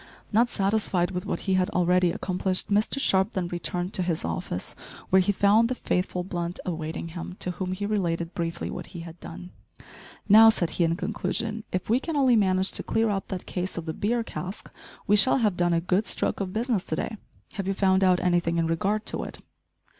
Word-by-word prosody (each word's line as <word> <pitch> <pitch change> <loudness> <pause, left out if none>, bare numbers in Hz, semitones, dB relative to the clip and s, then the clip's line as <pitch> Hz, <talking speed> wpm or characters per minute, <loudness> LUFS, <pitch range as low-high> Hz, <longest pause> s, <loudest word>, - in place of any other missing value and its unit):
Not 235 +3 +4
satisfied 195 -3 +1
with 180 -1 -4
what - - -2
he 195 - 0
had 185 -1 +2
already 180 0 +3
accomplished, 185 0 -1
Mr 210 +6 +1
Sharp 190 -4 +2
then 180 -2 -2
returned 175 +1 -3
to - - 0
his 175 -2 -1
office, 135 - -4 0.4
where 190 0 +6
he 185 - +2
found 205 +4 +4
the 255 - -1
faithful 180 -4 -1
Blunt 175 -1 -4
awaiting 165 -1 -4
him, 175 +2 -7
to 180 - -2
whom 185 +1 -4
he 200 +2 -3
related 175 -5 -1
briefly 170 0 -3
what - - -6
he - - -5
had 165 0 -10
done. 175 +2 -9 0.8
"Now," 220 +2 +9
said 175 -6 +1
he, 175 - +1
in 165 0 +2
conclusion, 220 +3 -3
"if 185 0 -2
we 235 +4 +3
can 325 +3 -4
only 265 -4 +4
manage 190 -2 +2
to - - -2
clear 225 -1 +1
up 195 -1 -2
that 185 -3 -5
case 180 0 -4
of 170 - -4
the 160 - -3
beer 230 +6 0
cask, 190 -2 -7 0.3
we 205 - +4
shall 210 +6 +5
have 215 -7 +1
done 175 0 +1
a 170 - +3
good 185 +5 0
stroke - - -1
of 195 -2 -3
business 225 -2 0
to 155 - -2
day. 220 - -3 0.3
Have 195 -3 -4
you 195 - 0
found 190 -1 +3
out 185 -1 +4
anything 175 -2 +1
in 165 - +2
regard 195 +6 0
to - - -2
it?" - - -7
185 Hz, 215 wpm, -26 LUFS, 175-210 Hz, 0.8 s, Now